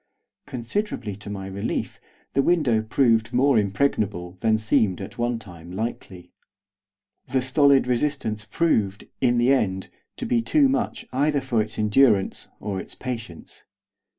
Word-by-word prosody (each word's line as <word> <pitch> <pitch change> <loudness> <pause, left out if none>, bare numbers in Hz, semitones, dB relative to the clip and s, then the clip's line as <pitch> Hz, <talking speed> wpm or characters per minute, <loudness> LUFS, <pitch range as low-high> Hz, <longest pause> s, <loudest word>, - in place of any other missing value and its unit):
Considerably 130 - -3
to 105 0 -10
my 100 -2 -5
relief 95 +1 -4 0.3
the 135 - +3
window 135 -9 +2
proved 115 0 +2
more 130 -1 +4
impregnable 100 -4 0
than 110 +1 +2
seemed 110 -3 +1
at 100 +4 -8
one 120 0 0
time 90 -6 -12
likely. 95 -3 -5 1.0
The 130 -1 0
stolid 140 +1 +4
resistance 125 -4 -1
proved, 105 -8 0 0.2
in 120 -2 +3
the 120 +3 +4
end, 95 -7 0 0.3
to - - -4
be 120 -1 +2
too 280 - +3
much 245 -4 -1
either 145 +2 +2
for 130 -4 0
its 110 +1 -4
endurance 105 -1 +2
or 100 -2 -3
its - - -9
patience. 115 -9 -7
115 Hz, 140 wpm, -24 LUFS, 100-135 Hz, 1.0 s, more